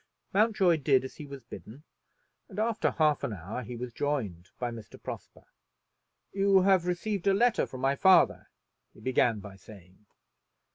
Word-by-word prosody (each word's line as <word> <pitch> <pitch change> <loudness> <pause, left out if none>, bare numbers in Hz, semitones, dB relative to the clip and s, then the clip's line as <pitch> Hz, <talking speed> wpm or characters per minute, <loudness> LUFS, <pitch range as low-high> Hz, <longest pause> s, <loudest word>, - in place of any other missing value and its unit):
Mountjoy 200 -5 +3
did 135 -3 +2
as 130 - -9
he 150 - -8
was 140 -3 -9
bidden, 120 +3 -11 0.7
and 195 - -12
after 225 +1 +1
half 155 -2 +1
an 110 - -2
hour 100 +7 -6
he 125 0 -7
was 120 0 -6
joined 110 - -3
by 120 -1 -3
Mr. 115 -3 -11
Prosper. - - -9 0.9
"You 195 -1 +4
have 185 -2 +3
received 185 +2 -2
a 195 - +4
letter 240 +3 +2
from 130 - -9
my 135 +1 +2
father," 190 +4 +4 0.5
he - - -16
began 120 -1 +1
by 100 -1 -11
saying. 95 0 -16
140 Hz, 160 wpm, -29 LUFS, 115-190 Hz, 0.9 s, You